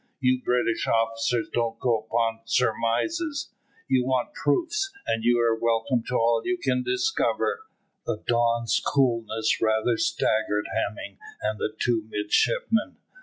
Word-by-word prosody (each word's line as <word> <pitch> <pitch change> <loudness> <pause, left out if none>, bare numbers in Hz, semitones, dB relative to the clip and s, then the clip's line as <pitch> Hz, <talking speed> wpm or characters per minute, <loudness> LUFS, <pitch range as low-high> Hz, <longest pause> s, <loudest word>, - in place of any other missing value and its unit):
You 130 -1 +2
British 125 -2 0
officers 115 +1 +1
don't 115 -1 0
go 120 -3 +1
upon 115 -1 0
surmises. 130 - 0 0.4
You 130 -1 +2
want 130 -1 -1
proofs, 340 - 0
and 115 0 -1
you 120 +1 +4
are 115 -1 +3
welcome 115 +2 +1
to 125 - -2
all 115 -1 +3
you 180 0 -1
can 130 -6 0
discover." 445 - 0 0.5
The 105 - -3
Don's 120 -1 +1
coolness 115 -5 +1
rather 110 +1 +2
staggered 110 -2 0
Hemming 100 -1 -3 0.2
and 105 0 -1
the - - -1
two 115 -3 0
midshipmen. 215 - +1
115 Hz, 130 wpm, -26 LUFS, 115-130 Hz, 0.5 s, you